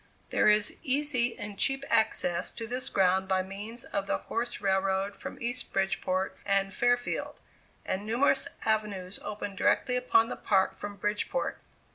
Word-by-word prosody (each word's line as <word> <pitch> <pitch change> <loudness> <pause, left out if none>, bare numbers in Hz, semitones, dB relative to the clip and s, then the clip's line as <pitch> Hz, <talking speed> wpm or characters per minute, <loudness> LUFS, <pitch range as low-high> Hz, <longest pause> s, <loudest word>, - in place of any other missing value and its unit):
There - - +4
is 210 0 +3
easy 265 -4 +1
and 205 -2 -7
cheap 270 0 +2
access 215 -6 +2
to 230 - -5
this 250 +3 -2
ground 190 0 +3
by 190 -1 +2
means 205 +5 -6
of 200 -1 -3
the - - +1
horse 240 +1 -3
railroad 195 0 +1
from - - -8
East 245 +1 -2
Bridgeport 190 -1 0
and 195 0 +1
Fairfield, 245 +3 0 0.5
and 190 +2 -1
numerous 235 +6 +2 0.2
avenues 205 -4 -1
open 205 -1 -5
directly 250 +6 +2
upon 250 -2 +3
the - - -4
park 190 -2 +2
from 205 0 -6
Bridgeport. 210 - -2
210 Hz, 150 wpm, -29 LUFS, 195-240 Hz, 0.5 s, There